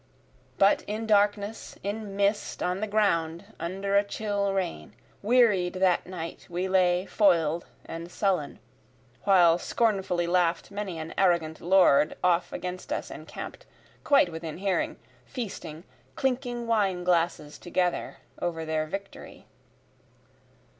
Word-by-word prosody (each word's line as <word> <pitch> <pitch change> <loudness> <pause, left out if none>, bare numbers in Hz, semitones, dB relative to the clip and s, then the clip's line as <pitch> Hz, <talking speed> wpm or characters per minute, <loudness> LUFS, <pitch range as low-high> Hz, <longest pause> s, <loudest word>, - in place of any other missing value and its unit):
But 195 +1 +4
in 215 +2 -3
darkness 205 0 +1
in 205 0 -4
mist 200 +1 0
on 180 +1 -1
the 215 - -2
ground 170 -5 +1
under 195 +3 -2
a 200 - +5
chill 205 -1 -2
rain, 170 - -3 0.3
Wearied 210 -6 +3
that 185 -2 +2
night 170 -3 -7
we 175 +2 -2
lay 185 -1 +3
foil'd 170 -6 +2 0.2
and 170 +1 -7
sullen, 185 -8 -1 0.7
While 175 -4 +5
scornfully 190 -5 0
laugh'd 175 0 +1
many 200 -4 -4
an 160 0 -6
arrogant 170 -4 +2
lord 170 -5 +4
off 180 -1 +2
against 180 0 -6
us - - -3
encamp'd, - - -9 0.4
Quite 275 -11 +4
within 160 -1 -6
hearing, 190 0 -1 0.3
feasting, 190 - -6 0.3
clinking 245 -2 -1
wineglasses 180 -8 0
together 180 0 -1 0.2
over 165 -2 -2
their 155 0 -1
victory. 195 +4 -8
185 Hz, 120 wpm, -27 LUFS, 170-205 Hz, 0.7 s, a